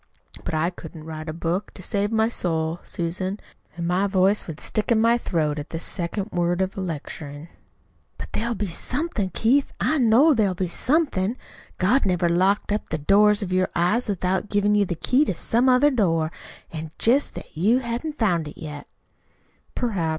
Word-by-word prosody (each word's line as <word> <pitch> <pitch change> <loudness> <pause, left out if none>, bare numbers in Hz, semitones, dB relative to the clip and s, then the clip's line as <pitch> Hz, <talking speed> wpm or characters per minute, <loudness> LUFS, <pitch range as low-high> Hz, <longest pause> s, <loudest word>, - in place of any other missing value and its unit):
But - - -3
I 165 +3 +1
couldn't 160 -3 -10
write 155 0 -7
a - - -1
book 170 +4 -3
to 185 - -10
save 205 +3 -1
my 220 0 +3
soul, 165 -6 -1
Susan, 185 +4 -3 0.4
and 170 - -3
my 185 +3 +2
voice 195 +1 +2
would 160 -3 -7
stick 215 +2 -1
in 225 - +4
my 230 +2 +4
throat 155 -8 -1
at 145 - -7
the 165 - -4
second 185 +5 -4
word 175 0 0
of 190 0 -1
a 195 - -4
'lecturing.'" 155 -2 -6 0.7
"But - - -7
there'll 235 +1 -1
be 205 - -2
somethin', 225 - -2
Keith, 250 +9 +2
I 310 - +1
know 255 +6 +5
there'll 205 -7 +1
be 185 +1 -1
somethin'. 250 - +1 0.4
God 205 +6 +2
never 180 -2 +2
locked 190 +5 +2
up 210 - -2
the 155 - -1
doors 205 +6 +4
of 185 -2 -3
your 185 0 +2
eyes 210 +8 +2
without 190 +1 -1
givin' 205 0 +2
you 205 -1 +3
the 175 - -3
key 255 - +2
to 190 - -2
some 240 +9 +2
other 260 +4 +5
door. 165 - +1 0.4
It's 160 -1 -6
jest 260 +5 +2
that - - -10
you 205 +10 +3
hain't 260 +5 -3
found 175 -8 +1
it 150 - -10
yet." 150 -2 -7 0.9
"Perhaps. 195 -10 -1
190 Hz, 185 wpm, -24 LUFS, 170-225 Hz, 0.9 s, know